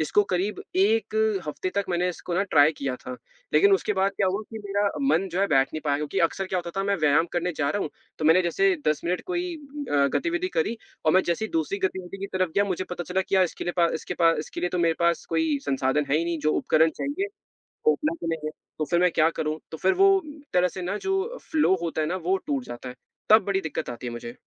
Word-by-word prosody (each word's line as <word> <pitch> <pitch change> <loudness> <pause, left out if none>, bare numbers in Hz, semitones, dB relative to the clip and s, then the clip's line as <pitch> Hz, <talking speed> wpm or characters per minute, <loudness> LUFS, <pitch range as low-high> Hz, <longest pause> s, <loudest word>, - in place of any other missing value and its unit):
इसको 160 +6 +3
करीब 190 +4 -1
1 215 +3 +2 0.3
हफ़्ते 165 +5 -3
तक, 200 0 +1
मैंने 180 0 +1
इस 180 - -5
को 175 - 0
ना 195 - +2
ट्राई 150 -5 +5
किया 135 -2 -2
था। 125 0 -8 0.4
लेकिन 400 0 +5
उसके 305 - +2
बाद 195 0 +1
क्या 200 - +2
हुआ 190 +3 0
कि 225 - -6
मेरा 200 0 +1
मन, 195 -9 +2
जो 180 +3 -2
है, 200 - +3
बैठ 135 -4 +3
नहीं 155 - -3
पाया, 140 -1 +2
क्योंकि 150 -1 -3
अक्सर 195 -1 -5
क्या 185 - -1
होता 175 -1 -5
था, 195 - -1
मैं 200 0 +1
व्यायाम 155 +1 +3
करने 175 +1 -1
जा 145 -1 +1
रहा 205 - -1
हूँ, - - -4 0.3
तो 155 - -3
मैंने 165 +4 +6
जैसे 385 - +2
10 150 -1 +1
मिनट 180 +1 -1
कोई 355 -1 -2 0.4
अ, 140 -1 +4
गतिविधि 345 +2 -1
करी, 435 - 0 0.3
और 155 - +4
मैं 185 - +5
जैसे 170 +5 0
ही 220 - -5
दूसरी 165 +5 -1
गतिविधि 190 0 -3
की 195 - -4
तरफ 185 -2 +1
गया, 200 - +3
मुझे 185 -2 -2
पता 175 -1 -4
चला 185 +2 0
कि - - 0
यार, 190 - +5
इसके 175 - -5
लिए 175 - -1
पा 170 -1 +5
इसके - - -4
पा 165 -1 +4
इसके 155 - -5
लिए 180 - 0
तो 180 - -2
मेरे 165 -1 +3
पास 170 0 +1
कोई 160 -3 +2
संसाधन 135 +1 +1
है 145 - +4
ही 165 - 0
नहीं, 170 -1 -2
जो 155 0 +1
उपकरण 160 +1 +3
चाहिए, 295 +8 -2 0.6
वो 460 - +7
उपलब्ध 310 - -2
नहीं 165 - -1
है। - - -2 0.3
तो 155 - 0
फिर 175 - +3
मैं 180 0 +4
क्या 155 0 +4
करूँ? 155 0 -1
तो 160 - -6
फिर 190 +4 +2
वो 390 - +8
उम, 305 -3 -10
तरह 180 0 +3
से 185 - -7
ना, 185 +4 -2
जो 385 - -2
फ़्लो 300 -12 +3
होता 165 -2 -2
है 155 - +1
ना, 180 - -1
वो 185 +1 0
टूट 275 -4 -1
जाता 120 - -8
है, 125 - -8 0.4
तब 215 -1 +7
बड़ी 195 0 0
दिक्कत 160 -7 -4
आती 120 +1 -7
है 120 - -4
मुझे। 120 0 -7
180 Hz, 265 wpm, -25 LUFS, 155-200 Hz, 0.6 s, वो